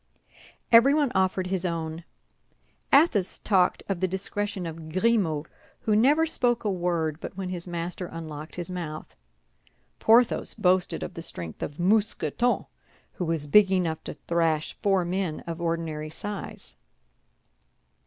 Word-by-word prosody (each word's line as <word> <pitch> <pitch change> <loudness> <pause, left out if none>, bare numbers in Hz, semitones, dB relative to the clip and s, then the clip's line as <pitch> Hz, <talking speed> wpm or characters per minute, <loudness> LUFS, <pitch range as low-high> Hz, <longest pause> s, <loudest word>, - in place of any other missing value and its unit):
Everyone 275 +4 +6
offered 190 0 +1
his 185 -1 -2
own. 165 -1 -3 0.9
Athos 270 - +4
talked 185 -4 +2
of 195 -3 -2
the 185 - +1
discretion 195 +1 -3
of 160 -1 -7
Grimaud, 185 -6 +1 0.4
who 215 - +1
never 290 +9 +4
spoke 245 -7 0
a 210 - 0
word 170 -4 -1
but 195 - -7
when 190 -2 -3
his 180 -1 -5
master 175 +1 -4
unlocked 155 -2 -8
his 175 -2 -5
mouth. 160 -4 -6 0.8
Porthos 235 +2 +3
boasted 185 -3 +1
of - - -6
the 165 - -7
strength 85 - -6
of 145 - -5
Mousqueton, 220 +5 +1 0.5
who 180 - -3
was 160 -3 -1
big 195 +6 +5
enough 170 -4 0
to - - -6
thrash 165 -2 0
four 195 -4 +2
men 180 -3 -2
of 170 0 -6
ordinary 165 -2 -2
size. 205 +5 -7
180 Hz, 135 wpm, -26 LUFS, 165-205 Hz, 0.9 s, Everyone